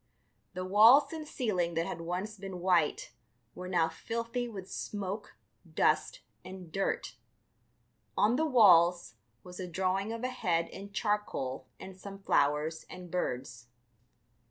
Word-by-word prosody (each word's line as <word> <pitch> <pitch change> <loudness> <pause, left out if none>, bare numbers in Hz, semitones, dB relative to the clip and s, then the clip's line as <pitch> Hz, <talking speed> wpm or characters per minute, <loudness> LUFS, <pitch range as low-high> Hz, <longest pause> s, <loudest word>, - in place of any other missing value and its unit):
The 185 0 -3
walls 225 - +6
and 310 -2 -6
ceiling 185 - -1
that 165 +1 0
had 170 - -5
once 180 +5 -4
been 190 -2 -7
white 175 -4 +1 0.4
were 180 - -7
now 175 -3 +2
filthy 230 +8 -4
with 195 -5 -8
smoke, 205 +1 -5 0.4
dust, 155 0 +1 0.2
and 185 -3 -10
dirt. 155 -8 -2 1.0
On 215 +4 +4
the 315 +4 +1
walls 180 - +5 0.3
was 180 0 -11
a 185 - -4
drawing 190 +4 -1
of 230 +1 -5
a 255 - 0
head 170 -8 0
in 200 +1 -9
charcoal 200 - -2
and 190 0 -9
some 195 +1 -9
flowers 155 -4 +1
and 180 -2 -10
birds. 125 -8 -3
185 Hz, 135 wpm, -31 LUFS, 170-210 Hz, 1.0 s, walls